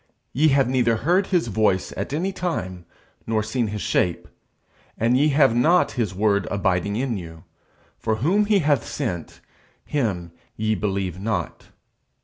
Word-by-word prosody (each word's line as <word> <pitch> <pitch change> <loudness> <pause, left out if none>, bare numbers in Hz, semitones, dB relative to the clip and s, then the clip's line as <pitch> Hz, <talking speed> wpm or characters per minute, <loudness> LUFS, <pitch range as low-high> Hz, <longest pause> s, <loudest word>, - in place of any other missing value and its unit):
_Ye 155 +4 +4
have 135 -2 +3
neither 125 -3 +2
heard 180 - +1
his 180 -3 +1
voice 105 -4 0
at 100 - -4
any 180 +7 -1
time, 95 - -4 0.4
nor 110 -1 +1
seen 115 +2 -1
his 105 0 -4
shape. 90 -1 0 0.7
And 115 +3 +2
ye 145 +4 +4
have 135 -5 +4
not 165 +9 +3
his 110 -7 -2
word 100 0 +1
abiding 100 0 0
in 120 -1 -1
you; 80 -3 -9 0.6
for 110 -1 0
whom 175 - +2
he 205 0 +3
hath 145 -5 +3
sent, 100 - -5 0.4
him 100 - -2 0.2
ye 110 0 0
believe 95 -3 -2
not_. 110 +3 -3
115 Hz, 150 wpm, -23 LUFS, 100-140 Hz, 0.7 s, Ye